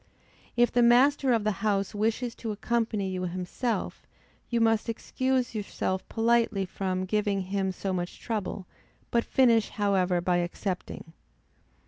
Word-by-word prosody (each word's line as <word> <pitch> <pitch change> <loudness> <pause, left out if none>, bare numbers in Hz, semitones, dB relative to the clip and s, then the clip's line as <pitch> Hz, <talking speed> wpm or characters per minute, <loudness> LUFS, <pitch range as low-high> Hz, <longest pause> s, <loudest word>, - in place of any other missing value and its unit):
If 240 0 +4
the 245 - +3
master 255 +3 +5
of 230 -3 +2
the 215 - +2
house 200 -2 0
wishes 225 +3 -1
to 225 -1 -5
accompany 215 -2 -1
you 185 -1 -3
himself, 185 +7 -3 0.4
you 235 - +1
must 225 0 +2
excuse 260 +2 -1
yourself 195 -3 -3
politely 225 -3 +2
from 185 0 -2
giving 205 0 0
him 190 0 -1
so 190 +1 -3
much 175 -1 -4
trouble, 210 -4 -3 0.5
but 235 -1 +2
finish 230 -5 +3
however 190 -3 +1
by 175 0 +1
accepting. 175 -1 -4
210 Hz, 135 wpm, -28 LUFS, 190-235 Hz, 0.5 s, master